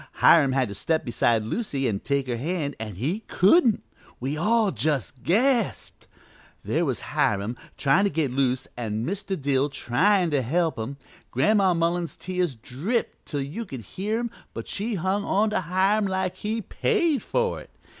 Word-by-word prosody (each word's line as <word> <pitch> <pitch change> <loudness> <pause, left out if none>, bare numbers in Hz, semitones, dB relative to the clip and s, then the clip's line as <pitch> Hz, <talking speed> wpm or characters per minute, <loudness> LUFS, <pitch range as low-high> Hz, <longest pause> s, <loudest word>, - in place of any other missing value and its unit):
Hiram 140 -5 +5
had 130 -2 +2
to - - -5
step 160 +10 0
beside 115 -2 +2
Lucy 135 - -2
an' 100 -4 -1
take 140 +2 -1
her 125 -2 -2
hand 150 +1 -2
an' 110 -3 -5
he 145 - -1
couldn't! 230 - +4 0.4
We 135 +4 -2
all 215 +5 +2
just 135 -1 -2
gasped. 230 - +1 0.6
There - - 0
was - - -1
Hiram 105 +3 +1 0.2
tryin' 170 +8 +3
to - - +2
get 150 -5 -1
loose 130 -1 0
and 110 0 -3
Mr. 195 0 -3
Dill 140 0 +1
tryin' 175 +8 +2
to 145 -2 +2
help 160 +4 0
him. 125 +6 -4 0.3
Gran'ma 190 - +3
Mullins's 170 0 0
tears 180 -6 -2
dripped 150 - -3
till 145 -3 -2
you 150 +12 -5
could 135 - -7
hear 200 - -3
'em, 235 -1 -3 0.2
but - - -6
she 215 +3 -2
hung 190 +3 0
on 210 +2 +1
to 210 - +1
Hiram 190 +4 +2
like 190 -1 -2
he'd 220 0 -3
paid 340 - +1
for 475 -1 -1
it. - - -15
165 Hz, 170 wpm, -25 LUFS, 130-200 Hz, 0.6 s, Hiram